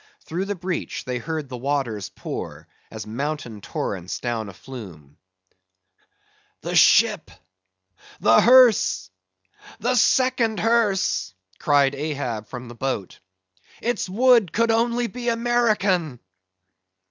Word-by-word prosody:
Through 180 +4 -4
the 205 0 -3
breach, 180 -1 -4
they 125 -1 -3
heard 155 +2 -4
the 130 - -7
waters 125 -6 -2
pour, - - -7 0.2
as 110 -1 -8
mountain 120 -1 -5
torrents 90 -2 -4
down 115 -4 -3
a - - -11
flume. 90 - -11 1.5
"The - - -4
ship! - - +4 0.9
The 115 +1 +5
hearse!—the 95 - +2
second 245 -2 +2
hearse!" 210 - +1 0.2
cried 140 -2 +3
Ahab 140 -7 -4
from 125 -1 -8
the 120 - -9
boat; 120 -6 -4 0.6
"its 240 -5 -2
wood 230 -2 +4
could 230 +3 +1
only 235 +1 +1
be 240 +1 -4
American!" 215 - +1
150 Hz, 110 wpm, -23 LUFS, -, 1.5 s, The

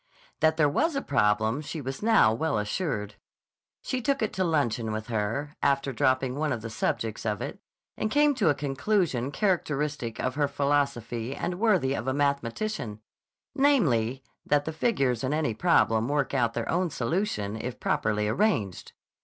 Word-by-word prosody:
That 160 0 +3
there 155 - +4
was 300 - +1
a 275 - 0
problem 110 +1 +1
she 155 +1 -6
was 135 -1 -5
now 220 - +5
well 120 +1 0
assured. 105 - -2 0.7
She 255 - -2
took 275 0 0
it 215 - -1
to 190 - 0
luncheon 125 -9 0
with 110 +1 -4
her, 115 +7 -2
after 140 -1 +1
dropping 130 -1 +1
one 150 +2 -1
of 110 - -3
the 115 - -5
subjects 110 0 -2
of 105 -2 -1
it, - - -5 0.4
and 215 - -1
came 290 +4 +4
to 215 -11 +2
a 145 - +3
conclusion 140 - 0
characteristic 150 - -1
of 130 - -1
her 145 +1 +1
philosophy 140 -4 -1
and 180 0 -3
worthy 190 -12 +3
of 120 -2 -4
a 130 - 0
mathematician; 140 - -1 0.5
namely, 140 - +2 0.2
that 145 0 +1
the 160 - -3
figures 135 - 0
in 135 +3 0
any 155 -7 0
problem 115 -6 +3
work 145 0 0
out 120 -4 +1
their 115 -1 -2
own 175 +1 +1
solution 125 - -2
if 125 +2 -5
properly 105 0 0
arranged. 110 - 0
140 Hz, 170 wpm, -27 LUFS, 115-165 Hz, 0.7 s, now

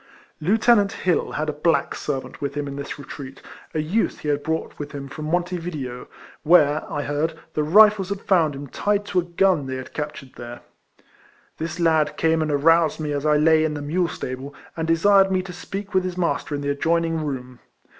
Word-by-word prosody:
Lieutenant 205 +4 +3
Hill 180 -2 0
had 155 - -2
a 150 - -1
black 160 +3 +1
servant 135 -3 -5
with 140 -1 -3
him 145 -1 -2
in 140 - -5
this 140 0 -6
retreat, 135 -1 -9 0.4
a - - +1
youth 170 +9 0
he 150 - -3
had 145 0 +1
brought 160 +2 -3
with 145 0 -6
him 140 -1 -6
from 150 +3 -7
Monte 175 +3 0
Video, 145 -8 -6 0.3
where, 155 -2 +4
I 145 - -2
heard, 155 +3 -1 0.2
the 155 - 0
Rifles 200 +4 +5
had 200 -1 -3
found 165 -7 +2
him 140 +1 -7
tied 205 +8 -1
to 185 -2 +1
a - - 0
gun 175 -4 +1
they 130 - -3
had 130 0 -8
captured 150 -3 -6
there. 120 0 -8 1.0
This 165 +2 -4
lad 160 -3 +2
came 160 0 +2
and 155 - -1
aroused 160 +2 +3
me 150 -1 -2
as 145 +1 -1
I 150 0 +4
lay 155 +1 +4
in 155 -1 -1
the 145 - -4
mule 170 +4 0
stable, 135 -1 -6 0.2
and 160 -1 -3
desired 195 +4 +4
me 185 -1 +1
to 180 -1 -8
speak 195 +3 -7
with 185 -1 +3
his 185 -1 -4
master 170 -4 -1
in 145 - -4
the 145 - -2
adjoining 165 +2 0
room. 130 -4 -5
155 Hz, 205 wpm, -23 LUFS, 145-180 Hz, 1.0 s, Rifles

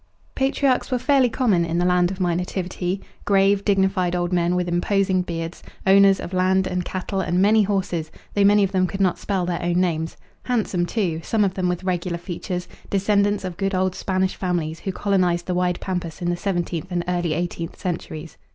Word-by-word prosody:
Patriarchs 270 -1 +1
were 255 - +1
fairly 255 0 +3
common 220 -8 +2
in 170 0 -1
the 175 - +2
land 180 -1 +3
of 190 0 -6
my 175 -2 +1
nativity: 180 +1 -3 0.2
grave, 195 0 +3
dignified 190 -3 +2
old 175 0 -1
men 175 0 +2
with 180 0 0
imposing 185 +2 +1
beards, 165 -1 -5 0.2
owners 195 0 +6
of 180 - -6
land 185 +1 +2
and 180 -1 -1
cattle 190 +2 -3
and 175 -1 0
many 215 +3 +5
horses, 185 -5 -1 0.2
though 205 - +3
many 205 +1 +5
of 195 - 0
them 185 -1 +2
could 195 - -6
not 190 -2 +2
spell 190 -3 -1
their 175 -1 -2
own 175 0 +1
names; 165 -3 -1 0.2
handsome 205 -8 0
too, 175 -8 -1
some 215 -2 +2
of 190 - -1
them 185 -2 -1
with 180 +1 -2
regular 180 -1 -1
features, 180 +1 -5 0.2
descendants 200 +1 +2
of 180 -2 -5
good 195 -1 -1
old 185 0 +1
Spanish 190 0 -1
families 170 -4 -2
who 190 - -3
colonized 180 -3 +1
the 180 - -2
wide 180 0 0
pampas 180 -3 -4
in 175 -1 -1
the - - 0
seventeenth 175 -2 -3
and 175 -1 0
early 175 -2 0
eighteenth 170 0 -4
centuries. 165 -3 -5
185 Hz, 195 wpm, -23 LUFS, 175-195 Hz, 0.2 s, owners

